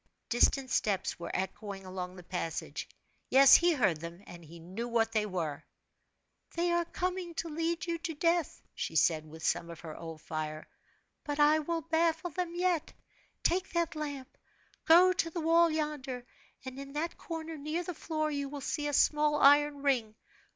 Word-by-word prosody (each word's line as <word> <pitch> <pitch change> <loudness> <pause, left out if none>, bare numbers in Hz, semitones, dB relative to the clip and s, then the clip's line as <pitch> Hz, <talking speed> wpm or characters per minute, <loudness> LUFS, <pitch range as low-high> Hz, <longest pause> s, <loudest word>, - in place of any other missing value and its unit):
Distant 260 +2 +2
steps 195 -7 0
were 170 - -5
echoing 195 +1 -4
along 185 -1 -6
the 180 - -11
passage. 170 -2 -4 0.4
Yes; 270 0 +8
he 345 +1 +7
heard 195 - +2
them, 170 +3 -8
and 175 -1 -11
knew 175 +8 -6
what 225 -1 +1
they 215 -1 0
were. 160 -6 -3 0.9
"They 345 +1 +1
are 345 0 +2
coming 360 0 -3
to 335 - -3
lead 330 +2 -2
you 335 -1 -2
to 325 -1 -4
death!" 335 +1 0
she 160 - -4
said, 155 -1 +3
with 160 +1 -8
some 170 0 0
of 170 -2 -9
her 160 -2 -8
old 165 -1 -8
fire; 155 -1 -5 0.6
"but 290 0 -4
I 300 +1 +5
will 330 +2 -2
baffle 330 +2 0
them 345 +1 -3
yet. 355 -3 0 0.5
Take 370 +2 +1
that 340 -1 0
lamp 285 -4 -6 0.5
go 360 +3 +7
to 330 - 0
the 340 - -4
wall 335 +1 +4
yonder, 295 -5 -3 0.4
and 260 +1 -7
in 275 0 -8
that 320 +3 -2
corner, 325 -1 -6
near 305 +4 -3
the 360 - -5
floor, 310 -1 -2
you 285 -1 -3
will 290 0 -6
see 295 +2 -2
a 290 - -2
small 300 +1 +3
iron 290 0 +5
ring. 240 -6 +1
290 Hz, 175 wpm, -31 LUFS, -, 0.9 s, Yes